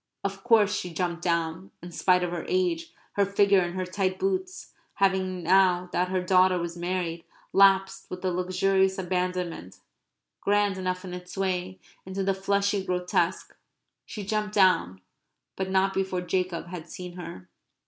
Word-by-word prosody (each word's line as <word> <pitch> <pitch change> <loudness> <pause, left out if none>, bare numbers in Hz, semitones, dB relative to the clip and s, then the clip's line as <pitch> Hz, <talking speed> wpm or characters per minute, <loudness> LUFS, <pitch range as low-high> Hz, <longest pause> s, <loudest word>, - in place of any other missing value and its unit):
Of 195 0 -4
course 220 -4 +4
she 180 -3 -3
jumped 170 0 -2
down, 170 +1 -1
in 175 - -8
spite 180 +1 +2
of 175 - -2
her 175 -1 -4
age, 340 -3 0 0.2
her 200 - +2
figure, 200 0 +4
and 175 0 -3
her 185 0 -2
tight 185 0 -1
boots 375 -1 -3 0.2
having, 190 -2 +1
now 180 0 +3
that 180 - +1
her 185 -1 -1
daughter 185 0 +4
was 170 -1 -4
married, 175 -1 -3 0.3
lapsed 195 0 +4
with 180 +1 -6
a 185 - +1
luxurious 190 +2 +1
abandonment, 180 - -3 0.6
grand 205 -1 +1
enough 185 0 -3
in 180 - -7
its 180 +1 -9
way, 185 -1 -2 0.2
into 190 +1 -4
the 195 0 +2
fleshy 200 +1 0
grotesque; 180 -1 -1 0.5
she 205 -3 -7
jumped 210 0 -2
down, 165 - +3 0.5
but 190 0 -3
not 190 0 +2
before 190 -2 -1
Jacob 180 -1 -2
had 170 -2 -8
seen 180 +1 -8
her. 135 - -9
185 Hz, 160 wpm, -27 LUFS, 180-195 Hz, 0.6 s, course